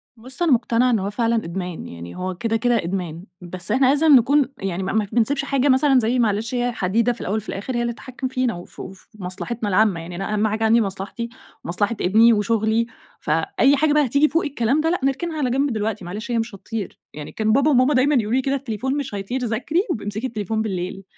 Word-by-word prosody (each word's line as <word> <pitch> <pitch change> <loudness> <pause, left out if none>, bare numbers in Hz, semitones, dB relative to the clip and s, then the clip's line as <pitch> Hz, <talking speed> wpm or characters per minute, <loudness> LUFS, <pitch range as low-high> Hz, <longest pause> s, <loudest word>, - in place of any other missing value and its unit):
بُصّ، 255 +7 -11
أنا 340 - +3
مقتنعة 240 0 +3
إن 225 - +2
هو 195 +1 -2
فعلًا 230 +2 0
إدمان، 180 -4 -4
يعني 85 +1 -9
هو 185 0 -4
كده، 225 +4 -1
كده 235 -3 +1
إدمان، 175 -2 -4 0.2
بس 180 +1 -5
إحنا 265 - +3
لازم 290 +1 +5
نكون 275 +4 +4
يعني 190 -1 -3
ما 195 - -2
ما 215 -1 +1
ف 200 - -16
ما - - -2
بنسيبش 275 +4 +1
حاجة 275 0 +1
مثلًا 265 0 +5
زي 245 +2 +1
معلش 225 +2 0
هي 245 0 0
حديدة 230 +3 +1
في 240 - -12
الأول 205 +4 -1
وفي 215 - -6
الآخر، 205 +6 -4
هي 240 - 0
اللي 235 0 -1
تتحكم 255 +2 -6
فينا 255 -2 -1
وف 175 0 -11
وفي 190 0 -9
مصلحتنا 205 +4 -4
العامة 200 -2 +3
يعني، 170 +1 -8
أنا 195 +3 -3
أهَم 210 +1 +2
حاجة 215 +1 -2
عندي 225 +1 +4
مصلحتي، 200 +3 -4 0.3
ومصلحة 205 +6 -1
ابني 225 +5 +5
وشغلي، 220 +2 +1 0.3
فأي 220 - +2
حاجة 300 +1 +2
بقى 300 -1 +4
هتيجي 280 +5 +3
فوق 330 +4 +1
الكلام 275 0 +1
ده، 325 - +1
لأ، 355 - 0
نركنها 315 +5 -1
على 275 -4 0
جنب 270 +1 +1
دلوقتي، 215 -3 -3
معلش 210 +7 -6
هي 235 - +1
مش 225 -2 -4
هتطير، 210 +1 -6
يعني 150 -1 -8
كان 220 0 0
بابا 275 +6 +3
وماما 260 +2 +4
دايمًا 280 +3 +3
يقولوا 220 -3 +1
لي 260 - +3
كده 270 +1 0
التليفون 265 +1 -3
مش 280 -7 -4
هيطير، 200 +6 -3
ذاكري 240 +9 -1
وابقي 240 - -3
امسكِ 210 +4 -3
التليفون 220 -2 -2
بالليل، 190 -2 -4
225 Hz, 230 wpm, -22 LUFS, 200-260 Hz, 0.3 s, لازم